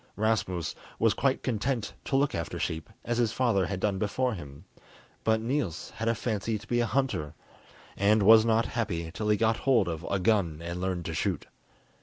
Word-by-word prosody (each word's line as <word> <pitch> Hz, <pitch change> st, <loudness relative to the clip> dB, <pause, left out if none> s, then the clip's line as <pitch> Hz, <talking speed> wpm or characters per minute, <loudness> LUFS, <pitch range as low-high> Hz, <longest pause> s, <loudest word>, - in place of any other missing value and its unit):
Rasmus 100 Hz, -6 st, 0 dB, 0.2 s
was 115 Hz, -1 st, +3 dB
quite 135 Hz, 0 st, 0 dB
content 120 Hz, -1 st, -1 dB
to -, -, -1 dB
look 140 Hz, +1 st, +2 dB
after 85 Hz, -2 st, -3 dB
sheep, 80 Hz, -1 st, -3 dB, 0.2 s
as 120 Hz, 0 st, -1 dB
his 115 Hz, -3 st, +2 dB
father 110 Hz, -8 st, +1 dB
had 100 Hz, -2 st, -3 dB
done 100 Hz, -1 st, 0 dB
before 125 Hz, +5 st, 0 dB
him, 70 Hz, -7 st, -9 dB, 0.6 s
but 110 Hz, 0 st, +3 dB
Niels 115 Hz, -, -2 dB
had 115 Hz, +1 st, -2 dB
a 115 Hz, -, +2 dB
fancy 110 Hz, -1 st, -2 dB
to -, -, -13 dB
be 120 Hz, -, 0 dB
a 120 Hz, -, +2 dB
hunter, 125 Hz, -, -1 dB, 0.6 s
and 105 Hz, +2 st, +3 dB
was 110 Hz, +2 st, +8 dB
not 115 Hz, 0 st, +2 dB
happy 85 Hz, -8 st, -2 dB
till 105 Hz, +4 st, -3 dB
he 105 Hz, -, +4 dB
got 115 Hz, 0 st, +2 dB
hold 120 Hz, -8 st, +3 dB
of 85 Hz, -1 st, -4 dB
a 100 Hz, -, +1 dB
gun 90 Hz, -5 st, +1 dB
and 85 Hz, +1 st, -5 dB
learned 90 Hz, -2 st, -2 dB
to -, -, -3 dB
shoot. -, -, -1 dB
110 Hz, 195 wpm, -28 LUFS, 90-115 Hz, 0.6 s, was